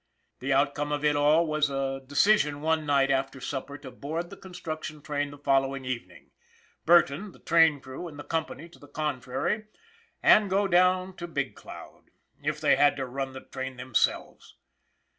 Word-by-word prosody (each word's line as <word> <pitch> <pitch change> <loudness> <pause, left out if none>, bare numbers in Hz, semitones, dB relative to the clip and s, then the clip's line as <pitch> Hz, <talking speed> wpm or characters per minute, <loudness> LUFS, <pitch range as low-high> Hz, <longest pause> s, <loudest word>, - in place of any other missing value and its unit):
The 135 +2 -3
outcome 145 +2 +1
of 150 0 -1
it 150 0 +3
all 150 +3 +4
was 155 -2 +1
a 135 -1 -2
decision 145 +1 +2
one 160 -1 0
night 140 -1 +3
after 135 0 -1
supper 140 +2 -5
to 135 -2 -10
board 165 +7 -5
the - - -8
construc 165 -5 -7
tion 155 -2 -8
train 145 -1 -2
the 145 - -11
following 135 -1 0
evening, 90 - -6 0.6
Burton, 175 +3 +4
the - - -17
train 165 -3 +4
crew 130 +6 -8
and 150 -3 -11
the 145 - -7
company 160 -1 -4
to 170 - -18
the 145 - -15
contrary, 150 - -2 0.6
and 210 -2 +6
go 200 +1 +2
down 185 +1 +3
to 175 - -6
Big 140 -5 -3
Cloud - - -12 0.4
if - - -2
they - - +3
had 145 0 +4
to 135 -2 -3
run 135 +1 -4
the 130 - -8
train 130 -1 -7
themselves. 125 -2 -1
145 Hz, 180 wpm, -27 LUFS, 135-165 Hz, 0.6 s, and